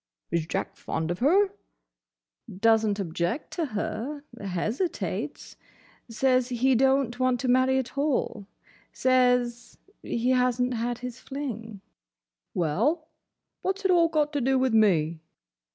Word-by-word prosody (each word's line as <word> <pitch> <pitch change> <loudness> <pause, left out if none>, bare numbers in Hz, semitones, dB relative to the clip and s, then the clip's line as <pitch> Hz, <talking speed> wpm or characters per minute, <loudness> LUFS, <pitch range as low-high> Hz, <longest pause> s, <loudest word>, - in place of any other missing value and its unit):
"Is 165 -1 0
Jack - - -3
fond 160 +1 -3
of 175 - -4
her?" 380 +10 +4 1.0
"Does 225 +3 +3
n't 205 0 -1
object 175 - -2
to 335 - -1
her. 245 +5 -4 0.2
Hesitates. 210 - -3 0.5
Says 255 +2 +2
he 255 +2 +2
don't 265 -1 +2
want 255 -1 +2
to 260 - -2
marry 255 +1 +3
at 260 0 -3
all. 265 -8 -1 0.4
Says 250 -2 +1 0.2
he 240 +2 -1
has 250 -1 +2
n't 250 0 +1
had 240 +1 -2
his 250 0 -6
fling." 230 -8 -6 0.7
"Well—what's 315 - -3
it 380 - +4
all 340 -2 +5
got 305 -2 +1
to 290 - 0
do 265 +2 +2
with 260 -2 +1
me?" 170 -7 +3
250 Hz, 130 wpm, -27 LUFS, 220-270 Hz, 1.0 s, all